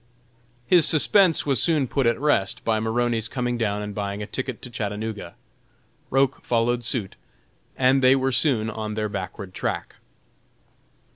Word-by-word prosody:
His 170 -1 +5
suspense 165 +3 +4
was 135 -5 +1
soon 155 -6 +2
put 135 0 0
at 115 0 +1
rest, 135 -10 0
by 110 -1 +1
Maroney's 115 0 -1
coming 125 0 -2
down 105 -3 -1
and 105 0 -6
buying 100 0 -4
a - - -4
ticket 130 +3 -5
to 125 - -8
Chattanooga. 105 -4 -5 0.7
Roch 135 -1 +1
followed 120 +1 0
suit, 110 -4 -2 0.6
and 130 +1 +3
they 130 +1 +6
were 135 0 0
soon 125 -5 +1
on 110 -1 -5
their 105 -1 -2
backward 95 0 -6
track. - - -4
115 Hz, 150 wpm, -24 LUFS, 105-135 Hz, 0.7 s, they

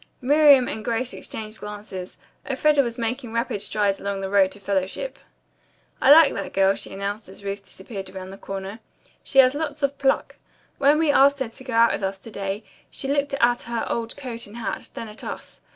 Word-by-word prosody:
Miriam 285 -1 +6
and 220 - -4
Grace 235 +3 -1
exchanged 215 0 -6
glances. 205 -3 -7 0.3
Elfreda 290 +2 +3
was 235 -3 -3
making 240 0 -3
rapid 230 -3 -1
strides 205 -1 0
along 200 -1 -3
the 190 0 -4
road 195 -2 +4
to 205 - -8
fellowship. 195 - -2 0.8
"I 270 - +6
like 310 -1 +8
that 200 - -5
girl," 195 0 +4
she - - -6
announced 200 +2 -4
as 195 +1 -12
Ruth 200 0 -4
disappeared 195 0 -8
around 190 0 -8
the 195 - -10
corner. 195 +2 -6 0.4
"She 270 - -4
has 260 -1 +8
lots 295 -1 -4
of 280 0 0
pluck. 270 -1 +1 0.4
When 285 +2 +5
we 315 -2 +3
asked 280 0 +5
her 265 -4 -3
to 230 - -12
go 255 -2 -6
out 230 0 +5
with - - -3
us 195 0 -2
to 225 - -11
day 200 +1 -4 0.3
she 270 - -4
looked 285 0 0
at 240 -2 +2
her 235 -1 -3
old 230 +2 -3
coat 240 -5 -5
and 210 +3 -11
hat, 235 - -4
then 230 - -5
at 215 0 -11
us. - - -8
230 Hz, 205 wpm, -24 LUFS, 200-270 Hz, 0.8 s, like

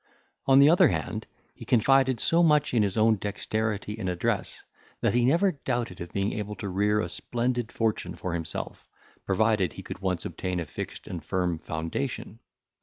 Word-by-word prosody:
On 135 0 +6
the 140 +1 +8
other 170 +3 +6
hand, 80 -4 -3 0.3
he - - -11
confided 130 +1 +3
so 165 +9 +3
much 150 -4 +3
in 115 - +4
his 100 0 0
own 110 0 +4
dexterity 105 +1 -2
and 95 -4 -2
address, 90 -1 -2 0.4
that - - +2
he 120 0 +3
never 170 +10 +4
doubted 120 - -3
of 85 - -6
being 100 +1 -1
able 105 0 -4
to 100 - -5
rear 105 +3 +2
a - - -2
splendid 120 -1 -2
fortune 115 -2 -1
for 90 - -4
himself, 80 -2 -5 0.4
provided 100 -1 +2
he - - -9
could - - -7
once 95 -2 -2
obtain 90 -1 -3
a 85 - -3
fixed - - -7
and - - -6
firm 90 -3 -1
foundation. 95 +9 -4
110 Hz, 180 wpm, -27 LUFS, 95-125 Hz, 0.4 s, the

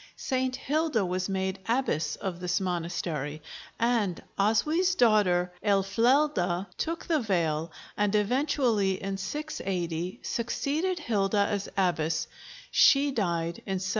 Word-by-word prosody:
St. 260 -1 -1
Hilda 290 -5 0
was 185 +1 -2
made 190 0 -2
abbess 230 - 0
of 185 -3 -5
this 180 -1 0
monastery, 170 -5 -3 0.4
and 225 -6 +1 0.2
Oswy's 305 - +2
daughter 185 - +3
Aelfleda 200 -1 +2
took 330 +1 -3
the 320 -3 +2
veil 165 - 0 0.2
and 210 0 +1
eventually, 230 -2 +2
in 195 0 -3
680, 190 - -3
succeeded 300 +9 -1
Hilda 205 - +1
as 200 -1 -2
abbess; 165 -4 +1 0.5
she 280 +1 +5
died 170 -8 -1
in 190 -1 -1
713. 185 0 -3
195 Hz, 115 wpm, -28 LUFS, 180-255 Hz, 0.5 s, she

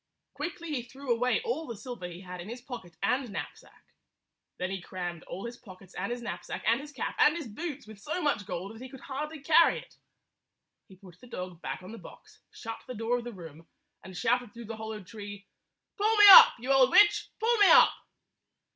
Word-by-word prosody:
Quickly 335 +2 -6
he 255 - -1
threw 260 +1 -3
away 250 - +1
all 455 -9 -3
the 235 -3 -7
silver 225 -5 -7
he 175 +1 -10
had 180 -1 -8
in 185 - -10
his 240 +2 -7
pocket 235 -10 -10
and 250 +5 0
knapsack. 200 - -9 0.7
Then 185 +1 -3
he 195 -1 -4
crammed 175 -2 -6
all 190 +5 -7
his 235 +1 -7
pockets 190 -5 -15
and 195 +5 -4
his 240 0 -5
knapsack - - -6
and 230 +4 +2
his 295 +1 -11
cap 270 - -4
and 300 - +5
his 330 - -6
boots 290 +5 -6
with 215 -1 -13
so 300 - -4
much 285 - -1
gold 185 +3 -5
that 225 - -13
he 260 - -8
could 265 -1 -12
hardly 295 +2 -6
carry 330 +2 +5
it. - - -12 0.9
He 190 - -16
put 180 -2 -17
the 250 - -14
dog 180 -6 -7
back - - -6
on 185 - -10
the 230 - -9
box, - - -15
shut 225 -1 -8
the 255 - -7
door 230 +3 -1
of - - -8
the 240 - -6
room, 165 -5 -12 0.4
and 185 -1 -10
shouted 240 +5 0
through 235 0 -9
the 225 +1 -7
hollow 220 -1 -7
tree, 205 0 -10 0.5
"Pull 435 +2 +2
me 415 - +8
up, - - +11
you 250 +3 -3
old 265 -1 +5
witch! 415 +7 +5
Pull 460 +2 +2
me 405 - +7
up!" - - +7
235 Hz, 220 wpm, -29 LUFS, 190-270 Hz, 0.9 s, up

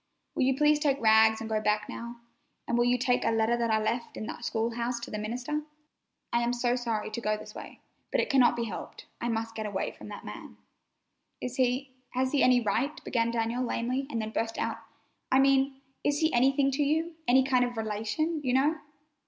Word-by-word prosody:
Will - - -2
you 265 0 +3
please 300 0 +4
take 285 -2 +1
Rags 220 -1 +5
and 225 - -4
go 215 -1 0
back 210 0 +1
now, 235 0 -7 0.5
and 235 - 0
will 240 0 +3
you 245 +1 +3
take 245 0 +1
a - - +2
letter 225 +1 +2
that 235 -1 0
I 220 - +3
left 230 +2 -2
in - - -4
the - - -7
school 230 0 -1
house 235 +1 -2
to - - -7
the 210 - -3
minister? 245 +8 -3 0.7
I 235 - +3
am 240 +1 +1
so 245 0 +1
sorry 230 -4 -2
to 235 - -4
go 215 -1 0
this 215 - -10
way, - - -10 0.3
but - - +1
it - - +1
cannot 260 -3 +4
be 235 - -1
helped. 215 -5 -7 0.2
I 240 - -1
must 225 0 -2
get 220 -1 -4
away 200 -2 -2
from - - -12
that - - -9
man." - - -9 0.8
"Is 250 0 -5
he—has 255 0 -1
he 285 - +2
any 250 -1 +5
right?" 260 +7 -1
began 230 -2 0
Daniel 230 +1 -1
lamely 255 +2 -1
and 230 - -2
then 220 0 -3
burst 225 0 -2
out: - - -2 0.5
"I 260 - +5
mean, 270 0 +3 0.2
is 290 0 +1
he 315 +1 +1
anything 270 +3 +3
to 280 +2 +1
you—any 315 -3 +2
kind 255 -2 +3
of 245 -1 -3
relation, 225 +9 -1
you 250 -2 0
know?" 295 +5 +3
245 Hz, 215 wpm, -29 LUFS, 225-270 Hz, 0.8 s, Rags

